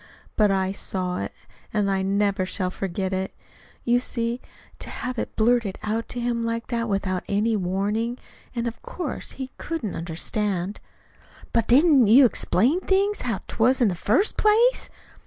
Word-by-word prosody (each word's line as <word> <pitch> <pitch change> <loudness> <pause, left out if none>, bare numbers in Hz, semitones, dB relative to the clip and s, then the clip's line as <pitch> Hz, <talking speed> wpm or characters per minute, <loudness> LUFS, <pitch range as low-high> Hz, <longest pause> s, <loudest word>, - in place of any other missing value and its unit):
But 210 -2 +4
I 190 -1 +1
saw 185 -2 -2
it; - - -4 0.4
and 205 -2 +1
I 190 0 +1
never 200 0 +1
shall 185 0 -2
forget 190 0 -3
it. 190 0 -3 0.5
You 240 0 +3
see, 235 -1 -2 0.4
to - - -5
have 250 -2 -4
it - - -4
blurted 225 -3 +2
out 220 +2 -1
to 245 - -4
him 235 -1 -1
like 230 0 -3
that 230 -2 -1
without 190 -2 -1
any 215 +3 +1
warning 205 +5 -1 0.4
and 235 0 -1
of 230 - -6
course 335 -7 -5
he 265 -1 -6
couldn't 290 - -3
understand." 180 +3 -2 0.7
"But 230 -2 +2
didn't 275 -2 +6
you 255 +6 +8
explain 245 - +2
things 395 +2 +1
how 230 -6 -2
'twas, 250 +4 +2
in 240 -5 +4
the - - -1
first 250 - +1
place?" 455 +4 +3
225 Hz, 160 wpm, -24 LUFS, 195-245 Hz, 0.7 s, you